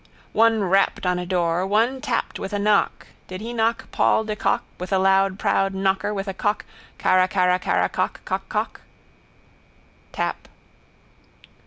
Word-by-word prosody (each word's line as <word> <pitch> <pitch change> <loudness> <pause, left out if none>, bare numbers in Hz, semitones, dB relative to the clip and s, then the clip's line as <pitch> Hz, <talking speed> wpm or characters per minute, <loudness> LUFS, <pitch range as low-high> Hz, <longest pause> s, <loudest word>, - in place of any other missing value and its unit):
One 225 -1 +4
rapped 195 +1 +2
on 180 0 +1
a 180 - -5
door, 175 -1 +1
one 230 +6 +1
tapped 295 - -2
with 195 - -5
a - - +1
knock, 205 0 +1 0.2
did 185 0 -7
he 230 +3 -6
knock 225 0 -1
Paul - - +2
de 215 -1 -3
Kock - - 0 0.2
with 180 +2 -6
a 190 - +3
loud 195 0 +3
proud 195 -1 +1
knocker 195 +1 0
with 200 -1 -4
a 195 - -3
cock 205 +2 -1 0.3
carracarracarra 185 0 +2
cock. - - -2
Cockcock. - - -3 1.3
Tap. - - -3
195 Hz, 145 wpm, -23 LUFS, 185-215 Hz, 1.3 s, One